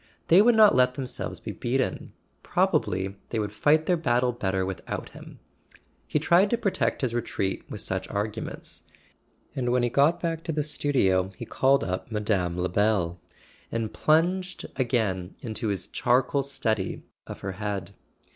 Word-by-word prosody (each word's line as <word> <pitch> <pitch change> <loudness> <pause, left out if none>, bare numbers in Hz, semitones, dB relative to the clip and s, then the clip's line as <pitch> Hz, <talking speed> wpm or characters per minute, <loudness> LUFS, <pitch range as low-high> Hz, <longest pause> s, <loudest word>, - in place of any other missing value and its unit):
They 175 +4 +8
would 235 +2 +5
not 215 -2 +7
let 125 0 +3
themselves 130 -2 -5
be - - -6
beaten—probably 100 -6 -1
they 115 - -2
would 105 -1 -2
fight 155 +7 +3
their 180 +1 +2
battle 125 -5 +2
better 95 -5 -1
without 95 -2 -5
him. - - -12 0.7
He - - 0
tried 175 +6 +4
to 235 - +1
protect 205 -5 0
his 125 -4 0
retreat 105 -5 -2
with - - -5
such - - -2
arguments, 105 +2 -4 0.7
and 125 -2 0
when 125 0 +2
he 120 - +2
got 145 +7 +3
back 165 -1 -2
to 170 - -1
the 150 -1 0
studio 125 -11 +1
he - - -6
called 135 +1 +2
up 90 +5 -4
Mme. 100 -5 0
Lebel, 90 -1 +1 0.5
and 115 -1 -2
plunged 175 +9 +1
again 110 -8 -1
into 110 -1 -4
his 100 -4 -1
char¬ 125 +1 +2
coal 140 +2 0
study 110 -8 -2 0.2
of - - -8
her 95 - -3
head. 100 0 -4
120 Hz, 155 wpm, -26 LUFS, 100-145 Hz, 0.7 s, They